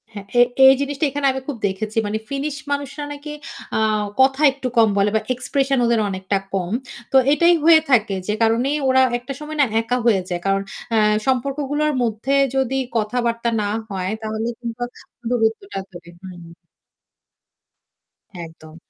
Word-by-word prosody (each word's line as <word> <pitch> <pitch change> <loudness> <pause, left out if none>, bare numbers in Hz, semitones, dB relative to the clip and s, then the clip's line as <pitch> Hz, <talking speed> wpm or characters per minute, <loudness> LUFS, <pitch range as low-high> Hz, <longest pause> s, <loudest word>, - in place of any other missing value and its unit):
হ্যাঁ, 200 -1 -8
এ - - +8 0.2
এই 265 - +9
জিনিসটা 280 +1 -1
এখানে 285 +1 -3
আমি 265 0 -5
খুব 285 -4 -4
দেখেছি। 210 +3 -5
মানে 210 +1 -1
ফিনিশ 280 +1 -3 0.2
মানুষরা 285 +1 -3
নাকি 290 +1 -8 0.4
আ - - +1 0.4
কথা 265 +2 +4
একটু 265 -1 -5
কম 225 -1 +6
বলে 200 +1 +3
বা - - +4
এক্সপ্রেশন 270 +2 -1
ওদের 235 -1 +2
অনেকটা 190 +1 -2 0.2
কম। 185 -2 -2 0.4
তো - - -2 0.2
এটাই 340 +3 +4
হয়ে 325 0 +7
থাকে 220 -6 +3
যে 210 - 0
কারণে 230 +4 +2 0.2
ওরা 260 0 +4 0.2
একটা 245 +3 -7
সময় 305 +1 -7
না - - +5 0.2
একা 245 +2 -1
হয়ে 210 -5 +3
যায়। 175 -1 -2
কারণ 195 0 +1 0.3
অ্যা 225 - +3 0.3
সম্পর্কগুলোর 280 +3 0
মধ্যে 230 +4 -1 0.2
যদি 265 0 0 0.2
কথাবার্তা 235 +1 -1
না 205 - -1 0.2
হয় 190 -1 -3
তাহলে 220 +1 -3
কিন্তু 235 0 -7 0.5
দূরত্বটা 230 - -1
ধরে, 175 -1 -12
হুম। 175 -3 -11 1.9
একদম। 160 -1 -14
240 Hz, 155 wpm, -21 LUFS, 210-275 Hz, 1.9 s, এই